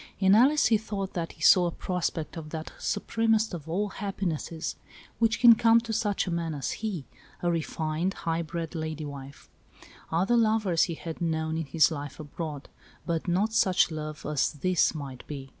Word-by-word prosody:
In 190 0 +4
Alice 270 +8 +5
he 220 -2 +4
thought 200 -3 -4
that 170 -2 -3
he - - -10
saw 180 -2 +7
a - - -2
prospect 170 -3 -3
of 160 -2 -7
that 160 0 -6
supremest 220 0 +1
of 160 -2 -7
all 205 +5 0
happinesses, 185 -5 -3 0.4
which 230 -1 +2
can 240 -2 +9
come 230 +1 +5
to 230 -1 -5
such 210 -2 0
a 180 - -3
man 165 -2 -2
as 140 - -3
he 200 -10 -4 0.2
— - - -26
a 175 - +2
refined, 165 +2 -2
high 165 0 0
bred 165 0 -5
lady 155 -2 -4
wife. 140 -1 -9 0.6
Other 185 +9 +2
loves 215 -7 +3
he 170 - -4
had 165 +1 -7
known 160 -1 -1
in 160 -2 -3
his 155 +4 +4
life 145 -2 -6
abroad, 150 -1 -6 0.4
but 170 -1 -2
not 195 +5 +1
such 185 -5 +3
love 155 -1 -6
as 150 -3 +1
this 175 +3 +1
might 135 -4 -7
be. 135 -2 -7
170 Hz, 185 wpm, -28 LUFS, 155-205 Hz, 0.6 s, can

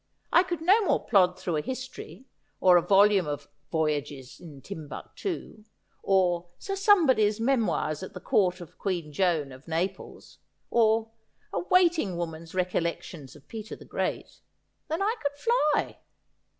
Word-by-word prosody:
I - - +7
could 350 -3 -4
no 390 +7 +5
more - - +1
plod 185 -4 +4
through 170 -4 -2
a - - 0
history, 255 +3 -7 0.3
or 180 -1 +6
a 175 - +6
volume 200 -1 +4
of 145 -1 -4
" 145 0 -45
Voyages 145 -4 -2
in 155 -5 -12
Timbuctoo," 200 - -7 0.4
or 180 -3 +2
" - - -41
Sir 390 0 -4
Somebody's 275 - +4
Memoirs 220 - 0
at 190 - -8
the - - -5
Court 180 -2 +1
of 170 - -13
Queen 170 -6 -3
Joan 160 -5 +1
of 130 +4 -14
Naples," 175 +4 -4 0.3
or 225 -1 +2 0.2
" - - -39
A - - 0
Waiting 345 - +2
woman's 165 0 -6
Recollections 170 -5 -3
of 145 -1 -17
Peter 220 -1 -7
the - - -14
Great," - - -4 0.5
than 325 +5 -1
I 435 +3 +1
could 285 0 -2
fly. 305 -6 +1
190 Hz, 155 wpm, -27 LUFS, 165-260 Hz, 0.5 s, I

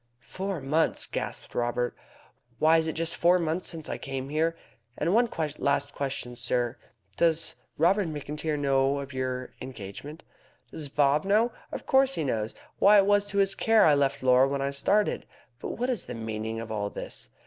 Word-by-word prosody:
"Four 190 -3 -4
months!" 150 +4 +1
gasped - - -5
Haw. 120 0 0 0.7
"Why, 160 +1 +5
it 160 0 +1
is 160 - -1
just 165 +1 0
four 175 +1 +4
months 170 +1 -1
since 160 -3 -6
I - - -4
came 135 0 -5
here. 165 +2 0 0.4
And 175 - 0
one 235 +2 +4 0.3
last 140 0 0
question, 135 -3 -3
sir. 120 0 -1 0.4
Does 165 -1 +2 0.2
Robert 185 +4 +3
McIntyre 150 0 -3
know 135 -1 +2
of 140 0 -6
your 130 -1 -3
engagement?" 130 +6 -8 0.5
"Does 150 -3 -6
Bob 145 +1 +3
know? 215 +5 +3 0.2
Of - - -6
course 270 0 +3
he 160 - -1
knows. 110 -5 -2 0.2
Why, 205 +1 +7
it 195 - +5
was 205 0 +3
to 200 0 -3
his 195 -1 +3
care 225 -1 +4
I 155 - +6
left 140 -1 +1
Laura 130 +1 +5
when 140 0 -2
I 140 - -1
started. 205 +9 +1 0.3
But - - -5
what 245 +2 -1
is 245 -7 -1
the 125 - -6
meaning 110 0 -4
of 115 -1 -6
all 105 -2 -2
this? - - -7
145 Hz, 180 wpm, -27 LUFS, 130-175 Hz, 0.7 s, Why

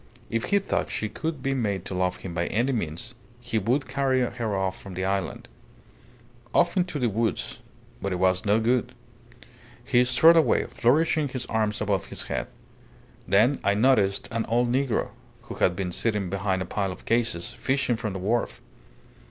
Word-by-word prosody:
If 115 0 0
he 200 - +3
thought 200 - -1
she 110 - -2
could 155 +2 -4
be 135 - +1
made 100 -8 -1
to - - -5
love 90 0 0
him 90 - -7
by 85 0 -1
any 120 +6 +1
means, 110 - -3 0.3
he 120 -2 -1
would 125 +7 0
carry 135 -2 +1
her 120 -4 -2
off 95 -1 -2
from 95 -2 -9
the 95 +1 -2
island. 95 -1 -2 1.1
Off 170 - +3
into 180 -4 0
the 125 -4 +1
woods. 115 0 -1 0.4
But 100 - -2
it - - 0
was 95 0 +2
no 105 +2 +3
good.... 120 +2 0 0.9
He 120 - +4
strode 160 +7 +6
away, 160 - +4
flourishing 155 +4 +2
his 130 -2 -4
arms 110 -2 -1
above 100 -2 0
his - - -4
head. - - -3 0.8
Then 110 +9 +4
I 100 - +2
noticed 105 -4 +3
an 115 -1 -1
old 120 +1 +2
negro, 130 -1 0 0.3
who - - -8
had 90 - +3
been 90 -1 -3
sitting 105 -2 -1
behind 95 -1 0
a - - -7
pile 95 +1 -2
of 90 - -11
cases, 115 -7 0
fishing 135 -2 0
from 110 -3 -4
the - - -4
wharf. 110 +6 -1
110 Hz, 180 wpm, -26 LUFS, 95-130 Hz, 1.1 s, strode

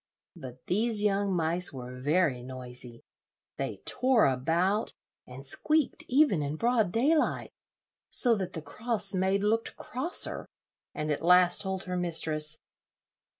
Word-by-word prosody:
But 130 -6 -11
these 215 +2 +1
young 200 -1 +1
mice 170 +2 +1
were 125 -2 -8
very 145 0 0
noisy; 125 -2 -9 0.5
they - - -5
tore 255 -3 +3
about, 165 - 0 0.3
and 130 +2 -11
squeaked 305 - 0
even 260 - +3
in 145 +1 -3
broad 230 -1 +1
daylight, 295 - +1 0.6
so 245 -2 +5
that 185 -2 -5
the 160 - -6
cross 215 -1 -3
maid 190 +1 0
looked 225 +2 -1
crosser, 270 +9 0 0.5
and 150 0 -3
at 145 - -2
last 180 +1 +4
told 190 -1 -4
her 180 -1 -4
mistress. 155 -3 0
180 Hz, 130 wpm, -28 LUFS, 150-215 Hz, 0.6 s, so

